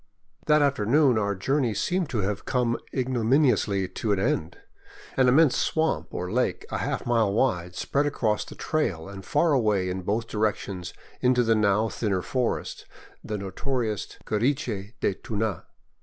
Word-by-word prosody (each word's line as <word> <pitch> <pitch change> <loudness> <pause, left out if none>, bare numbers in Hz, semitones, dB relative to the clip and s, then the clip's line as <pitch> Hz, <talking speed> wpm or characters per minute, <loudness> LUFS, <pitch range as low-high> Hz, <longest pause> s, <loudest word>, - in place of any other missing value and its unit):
That 150 -1 +5
afternoon 135 -1 +3
our 100 -1 0
journey 125 +3 0
seemed 180 - 0
to 110 - -1
have 100 +1 -2
come 120 -2 0
ignominiously 120 -6 +2
to 105 +4 -3
an 100 - +2
end. 85 -4 -1 0.6
An 130 -1 +4
immense 140 +2 +5
swamp 155 - 0
or 90 +1 -4
lake 125 +3 0
a - - -2
half - - -2
mile 115 -4 +2
wide 90 -6 0
spread 145 +9 0
across 110 -7 0
the - - -11
trail 95 - -1
and 100 -1 -9
far 165 - +2
away 105 -8 +2
in 95 +1 -3
both 105 +5 -1
directions 100 -4 -2 0.3
into 125 -1 +3
the 115 -1 +3
now 105 0 +2
thinner 100 -5 -1
forest, 125 -2 -2 0.4
the 105 - -3
notorious 110 +3 -3
" - - -25
curiche 110 -3 -1
de - - +2
Tuna." 105 -2 -3
110 Hz, 155 wpm, -26 LUFS, 100-130 Hz, 0.6 s, That